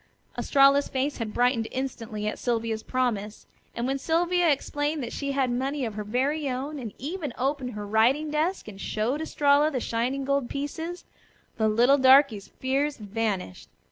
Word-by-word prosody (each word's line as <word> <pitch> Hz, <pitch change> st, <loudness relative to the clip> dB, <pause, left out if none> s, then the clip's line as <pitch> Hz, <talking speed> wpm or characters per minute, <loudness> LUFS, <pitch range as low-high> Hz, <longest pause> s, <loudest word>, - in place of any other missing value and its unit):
Estralla's 275 Hz, 0 st, +4 dB
face 275 Hz, +2 st, -2 dB
had 225 Hz, -3 st, -4 dB
brightened 240 Hz, -1 st, +1 dB
instantly 230 Hz, -5 st, -4 dB
at 215 Hz, -, -3 dB
Sylvia's 230 Hz, -2 st, -1 dB
promise. 220 Hz, -5 st, -2 dB, 0.3 s
And 235 Hz, -, -2 dB
when 270 Hz, +1 st, -1 dB
Sylvia 345 Hz, +3 st, +2 dB
explained 290 Hz, +1 st, -1 dB
that 235 Hz, -, -5 dB
she 280 Hz, -1 st, -3 dB
had 265 Hz, -2 st, +1 dB
money 265 Hz, +2 st, -1 dB
of 220 Hz, -, -4 dB
her 210 Hz, 0 st, -4 dB
very 270 Hz, +7 st, 0 dB
own, 275 Hz, +4 st, -4 dB
and 230 Hz, -5 st, -6 dB
even 295 Hz, -2 st, -5 dB
opened 265 Hz, -1 st, -1 dB
her 210 Hz, 0 st, -5 dB
writing 245 Hz, +9 st, +2 dB
desk 315 Hz, +3 st, -1 dB
and 195 Hz, -2 st, -9 dB
showed 240 Hz, +8 st, -1 dB
Estralla 295 Hz, -1 st, +3 dB
the 270 Hz, -5 st, -2 dB
shining 245 Hz, +4 st, -1 dB
gold 280 Hz, -2 st, 0 dB
pieces, 320 Hz, +5 st, -5 dB, 0.5 s
the 220 Hz, -, +2 dB
little 240 Hz, +6 st, +4 dB
darky's 260 Hz, -5 st, +5 dB
fears 275 Hz, +3 st, -1 dB
vanished. 205 Hz, -, -3 dB
260 Hz, 165 wpm, -26 LUFS, 230-285 Hz, 0.5 s, darky's